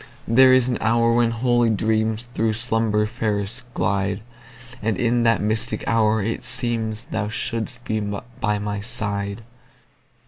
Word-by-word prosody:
There 130 +3 +6
is 130 -1 +4
an 125 - -1
hour 115 +1 +3
when 120 0 +3
holy 120 0 +2
dreamsThrough 110 +1 0
slumber 110 -2 +1
fairest 110 0 -3
glide; 100 +1 0 0.6
And 110 -2 0
in 120 +2 +1
that 115 -1 +3
mystic 110 +2 -2
hour 110 -2 +2
it 115 +3 -2
seemsThou 110 -3 0
shouldst 120 +1 -3
be 110 0 -1 0.4
by 105 -2 0
my 105 0 -3
side. 100 -1 -3
110 Hz, 130 wpm, -22 LUFS, 105-120 Hz, 0.6 s, There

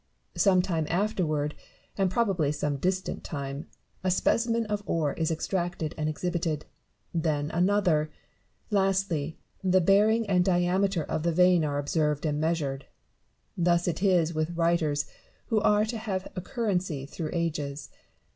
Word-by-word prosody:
Some 185 -3 +4
time 165 -5 -1
afterward, 165 -6 0 0.4
and 195 -2 +2
probably 185 -8 +1
some 150 -1 -1
distant 185 +5 -2
time, 140 0 -5 0.4
a 185 - +1
specimen 230 +5 +2
of 210 -1 -2
ore 155 -4 0
is 160 -1 -1
extracted 170 -1 -2
and 155 -1 -1
exhibited; 165 -1 -2 0.5
then 155 -3 0
another; 175 -4 +2 0.6
lastly 190 -6 +1 0.3
the 185 0 +4
bearing 210 +5 +4
and 180 -2 +3
diameter 180 0 +2
of 155 - -2
the 170 +2 +1
vein 180 0 +4
are 145 -1 -1
observed 150 +1 0
and 150 -1 0
measured. 150 -4 -1 0.7
Thus 170 0 +2
it 175 - -1
is 175 -4 +3
with 155 +2 -2
writers 165 -4 +1 0.4
who 220 -2 +2
are 210 0 +4
to 225 0 -4
have 195 -4 -3
a 180 - -3
currency 185 - -2
through 155 +2 -5
ages. 150 -4 -3
170 Hz, 140 wpm, -28 LUFS, 155-190 Hz, 0.7 s, Some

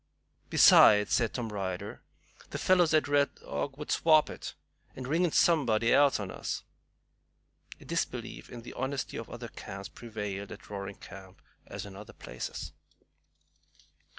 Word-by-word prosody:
"Besides," 105 -1 +7
said 115 -2 +2
Tom 120 -3 -4
Ryder, 95 -3 -4 0.5
"them - - -4
fellows 180 -3 +3
at 155 -2 +3
Red 145 0 +2
Dog 135 -1 -5
would 150 - -6
swap 155 -2 +4
it, - - -8 0.4
and 130 -1 -6
ring 165 +6 +1
in 175 - +2
somebody 120 -11 +3
else 140 -4 +4
on 100 -3 -5
us." - - -4 1.2
A - - -15
disbelief - - -4
in 120 -1 -9
the - - -9
honesty 130 +1 -3
of 115 - -6
other 120 -1 -7
camps 100 -1 -8
prevailed 105 -4 -6
at - - -11
Roaring 100 -1 -6
Camp, 95 -1 -12 0.3
as - - -7
in 100 -1 -10
other 105 +4 -11
places. 65 - -7
115 Hz, 150 wpm, -30 LUFS, 100-145 Hz, 1.2 s, Besides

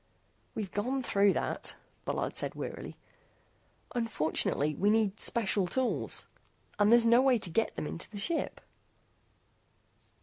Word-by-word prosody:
"We've 205 -4 -4
gone 255 +6 -1
through 200 -4 +3
that," - - -3 0.3
Bullard - - -2
said - - 0
wearily. - - -6 1.0
"Unfortunately 155 - 0
we 200 +7 +1
need 215 -1 +2
special 200 -5 +2
tools. 260 +6 -1 0.5
And 205 +1 +5
there's 235 0 +6
no 235 +2 +6
way 260 -2 +4
to 195 -5 -5
get 225 +6 0
them - - -3
into 165 - -5
the 210 - -9
ship." 320 +12 -2
215 Hz, 130 wpm, -31 LUFS, 195-235 Hz, 1.0 s, there's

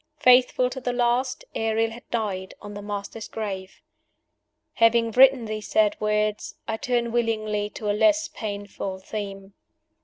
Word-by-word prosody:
Faithful 250 0 +5
to 260 +1 -6
the 245 - -1
last, 245 +1 0
Ariel 225 0 0
had 235 +2 -12
died 195 -5 -3
on 205 -1 -9
the 205 - -7
Master's 205 +2 -6
grave! 195 -4 -6 0.9
Having 230 0 +3
written 260 0 +6
these 215 -1 -5
sad 315 0 +3
words, 210 0 0
I 220 -1 -2
turn 240 0 0
willingly 215 -3 0
to 210 - -6
a 205 - +2
less 315 +7 +3
painful 205 - -5
theme. 195 0 -7
220 Hz, 145 wpm, -25 LUFS, 205-245 Hz, 0.9 s, written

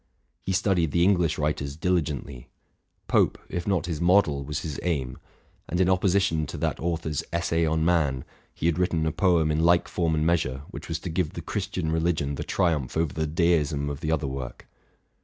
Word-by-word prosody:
He - - -3
studied 90 -4 +2
the 85 +4 +2
English 90 -3 +3
writers 75 -2 -2
diligently: 75 -7 -2 0.6
Pope, - - +2
if 85 +2 -4
not 95 -3 +1
his 85 -3 -3
model, 85 -6 +3
was 75 +3 -4
his 80 -6 -5
aim; 70 -8 -2 0.5
and, 85 - -1
in 95 0 +4
opposition 95 -4 +2
to - - -6
that - - -1
author's 80 -3 -2
'* - - -33
Essay 85 -1 +1
on 80 0 +1
Man," 75 -7 +1 0.3
he - - -6
had 85 0 +2
writ 90 - +2
ten 80 -1 0
a 80 - +1
poem 85 -3 +2
in 75 - 0
like 85 +1 +4
form 85 -3 0
and 75 0 0
measure, 70 -6 0
which - - -8
was 80 - -2
to 90 - -5
give 80 -1 -1
the 85 - -5
Christian 95 -4 -3
religion 80 -3 0
the - - -4
triumph 80 -8 0
over 80 -3 0
the 80 -1 -1
deism 75 -3 +1
of 70 - -6
the 80 -1 -2
other 80 -2 0
work. 65 -2 -6
80 Hz, 200 wpm, -26 LUFS, 75-85 Hz, 0.6 s, in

